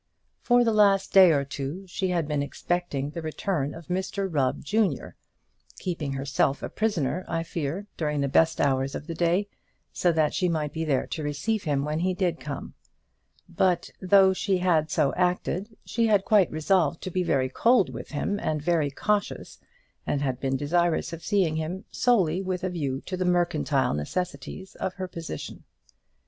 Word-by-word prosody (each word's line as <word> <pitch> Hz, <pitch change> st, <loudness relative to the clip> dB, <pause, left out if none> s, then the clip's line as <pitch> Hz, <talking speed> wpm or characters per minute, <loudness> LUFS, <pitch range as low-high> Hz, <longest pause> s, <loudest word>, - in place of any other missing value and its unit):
For 245 Hz, 0 st, +4 dB
the 225 Hz, -2 st, +2 dB
last 200 Hz, -2 st, +3 dB
day 190 Hz, -3 st, +8 dB
or 140 Hz, -2 st, +1 dB
two 140 Hz, +7 st, -5 dB
she 190 Hz, +1 st, -2 dB
had 170 Hz, -4 st, 0 dB
been 150 Hz, -2 st, 0 dB
expecting 145 Hz, -1 st, -2 dB
the 170 Hz, -, -5 dB
return 155 Hz, -2 st, -2 dB
of 165 Hz, -, -10 dB
Mr 190 Hz, +3 st, -2 dB
Rubb, 140 Hz, -7 st, 0 dB
junior 200 Hz, -, 0 dB, 0.6 s
keeping 160 Hz, -6 st, -3 dB
herself 135 Hz, 0 st, 0 dB
a -, -, -3 dB
prisoner, 185 Hz, -5 st, -1 dB
I 165 Hz, -1 st, -1 dB
fear, 165 Hz, +4 st, -4 dB
during 150 Hz, -2 st, -1 dB
the 140 Hz, -, +1 dB
best 160 Hz, +4 st, +3 dB
hours 135 Hz, -1 st, +1 dB
of -, -, -6 dB
the 165 Hz, -, -5 dB
day, 175 Hz, +4 st, +1 dB, 0.5 s
so 175 Hz, -, +2 dB
that 155 Hz, -2 st, +1 dB
she 180 Hz, -2 st, +1 dB
might 155 Hz, -3 st, -1 dB
be 160 Hz, -, -2 dB
there 145 Hz, -5 st, +1 dB
to 160 Hz, -, -5 dB
receive 165 Hz, +9 st, -2 dB
him 140 Hz, -2 st, 0 dB
when 150 Hz, +1 st, -1 dB
he 185 Hz, +2 st, 0 dB
did 175 Hz, -3 st, 0 dB
come; 145 Hz, -2 st, -6 dB, 0.7 s
but 180 Hz, -2 st, +1 dB
though 190 Hz, 0 st, +5 dB
she 190 Hz, 0 st, 0 dB
had 170 Hz, -4 st, +2 dB
so 145 Hz, -1 st, +1 dB
acted, 180 Hz, +4 st, -1 dB
she 230 Hz, -1 st, +1 dB
had 205 Hz, -3 st, +3 dB
quite 210 Hz, -6 st, +4 dB
resolved 160 Hz, 0 st, +1 dB
to 185 Hz, -, -4 dB
be 185 Hz, -, 0 dB
very 130 Hz, -7 st, +1 dB
cold 195 Hz, -, +3 dB
with -, -, -7 dB
him, 200 Hz, +7 st, -2 dB
and 155 Hz, -1 st, -1 dB
very 155 Hz, -1 st, +1 dB
cautious, 205 Hz, +8 st, -2 dB, 0.5 s
and 145 Hz, 0 st, 0 dB
had 130 Hz, -2 st, -1 dB
been 135 Hz, -1 st, 0 dB
desirous 170 Hz, +4 st, +1 dB
of 165 Hz, -, -7 dB
seeing 185 Hz, -7 st, +1 dB
him 170 Hz, +5 st, -4 dB
solely 190 Hz, -8 st, +2 dB
with 185 Hz, -1 st, -3 dB
a 185 Hz, -, -1 dB
view 140 Hz, -6 st, -2 dB
to 185 Hz, -, -5 dB
the 185 Hz, -, -1 dB
mercantile 175 Hz, -6 st, +1 dB
necessities 180 Hz, -, -4 dB
of 190 Hz, -, -4 dB
her 185 Hz, -1 st, -4 dB
position. 165 Hz, -, -7 dB
170 Hz, 180 wpm, -26 LUFS, 145-190 Hz, 0.7 s, day